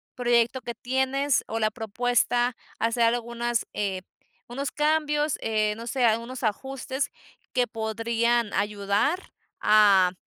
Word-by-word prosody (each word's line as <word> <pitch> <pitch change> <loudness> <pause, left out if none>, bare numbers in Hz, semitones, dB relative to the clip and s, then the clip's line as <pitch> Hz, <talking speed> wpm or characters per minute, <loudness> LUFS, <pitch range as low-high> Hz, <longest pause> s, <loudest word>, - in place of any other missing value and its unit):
proyecto 240 +1 +2
que 235 0 -6
tienes, 265 +3 0
o 225 - -3
la 215 0 +1
propuesta 245 +2 0 0.2
hacer 230 +1 +1
algunas, 235 0 0
eh, 195 -2 -2 0.5
unos 270 +3 -4
cambios, 300 -1 +1
eh, 215 -1 +1
no 230 +1 -8
sé, 255 +1 +1
algunos 235 +3 0
ajustes, 265 +5 -2 0.4
que 250 -1 +2
podrían 230 0 0
ayudar 210 - 0 0.3
a 200 -4 +5
235 Hz, 115 wpm, -26 LUFS, 220-260 Hz, 0.5 s, a